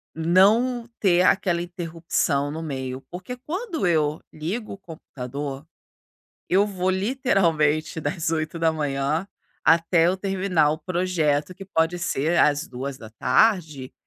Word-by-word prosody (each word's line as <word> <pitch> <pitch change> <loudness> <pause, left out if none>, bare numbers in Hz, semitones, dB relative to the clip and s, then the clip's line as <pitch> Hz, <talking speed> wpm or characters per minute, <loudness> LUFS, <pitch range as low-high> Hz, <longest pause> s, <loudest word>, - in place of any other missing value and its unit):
não 210 +9 +3
ter 180 -3 +4
aquela 180 -2 +2
interrupção 165 -4 -1
no 160 +2 -5
meio. 130 -4 -5
Porque 185 +8 -7
quando 325 - -3
eu 155 -2 +1
ligo 185 +9 -4
o - - -9
computador, 140 -5 -7 0.8
eu 195 +3 +4
vou 185 -3 -2
literalmente 175 - +1
das 165 +2 -2
8:00 155 -1 -1 0.4
até 165 0 +4
eu 185 +2 +1
terminar 185 -5 +1
o 155 - -3
projeto, 170 -3 0
que 195 - -10
pode 175 -2 0
ser 165 +1 0
às 150 0 +3
14:00, 130 - 0
165 Hz, 115 wpm, -24 LUFS, 150-190 Hz, 0.8 s, ter